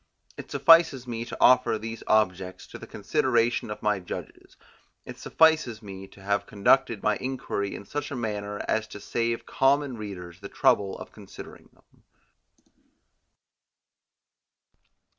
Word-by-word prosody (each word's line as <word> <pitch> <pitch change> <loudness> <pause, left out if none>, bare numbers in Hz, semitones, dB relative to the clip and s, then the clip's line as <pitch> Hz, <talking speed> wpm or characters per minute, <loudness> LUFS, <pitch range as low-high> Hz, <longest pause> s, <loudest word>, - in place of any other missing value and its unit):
It - - -10
suffices 165 -6 +5
me 115 -1 -4
to - - -8
offer 125 -3 +5
these 115 +1 -7
objects 95 -4 +1
to - - -10
the - - -10
consideration 120 -1 0
of 105 - -7
my 105 -2 +1
judges; 90 - -9 0.5
it - - -10
suffices 155 -9 +2
me 95 -1 -9
to 95 - -17
have 100 0 -1
conducted 110 +2 +2
my 105 - +2
inquiry 125 -6 -3
in 100 - -9
such 145 +5 -4
a 145 - -5
manner 105 -3 -4
as 110 0 0
to 105 - -10
save 115 +3 -2
common 140 0 +1
readers 90 -5 -8
the 100 0 -9
trouble 100 -1 +2
of - - -10
considering - - -12
them. - - -29
110 Hz, 140 wpm, -26 LUFS, 100-125 Hz, 0.5 s, suffices